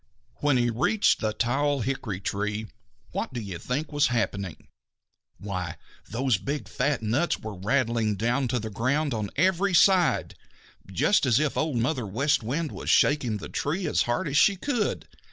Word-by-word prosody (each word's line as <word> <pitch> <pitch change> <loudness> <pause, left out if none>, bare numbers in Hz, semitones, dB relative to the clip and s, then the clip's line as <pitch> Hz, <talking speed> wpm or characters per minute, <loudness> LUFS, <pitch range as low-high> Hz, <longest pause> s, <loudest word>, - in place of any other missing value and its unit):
When 145 -3 +2
he 120 -1 +2
reached 155 - +2
the 110 -2 0
tall 140 +5 0
hickory 110 -5 -3
tree, 105 +2 -2 0.5
what - - -3
do - - -1
you 95 -6 -6
think 145 +6 -3
was 145 0 +3
happening? 100 -8 -2 0.7
Why, 90 -4 -4 0.3
those 120 -2 +1
big, 140 +5 -4
fat 140 -5 -1
nuts 130 +11 +1
were 110 -1 -7
rattling 115 +1 0
down 120 +6 0
to 125 +1 0
the 110 -2 -4
ground 135 +7 0
on 105 -3 -2
every 185 +4 +2
side, 185 0 +4 0.6
just 135 - +2
as 120 -1 +4
if 150 -2 0
Old 155 -5 0
Mother 120 -1 0
West 140 +10 +1
Wind 145 +8 -2
was - - -6
shaking 125 -7 +3
the - - -7
tree 170 +6 -2
as 150 - +1
hard 120 +3 0
as 140 0 0
she 200 - +5
could. 230 +1 -2
125 Hz, 170 wpm, -26 LUFS, 110-145 Hz, 0.7 s, she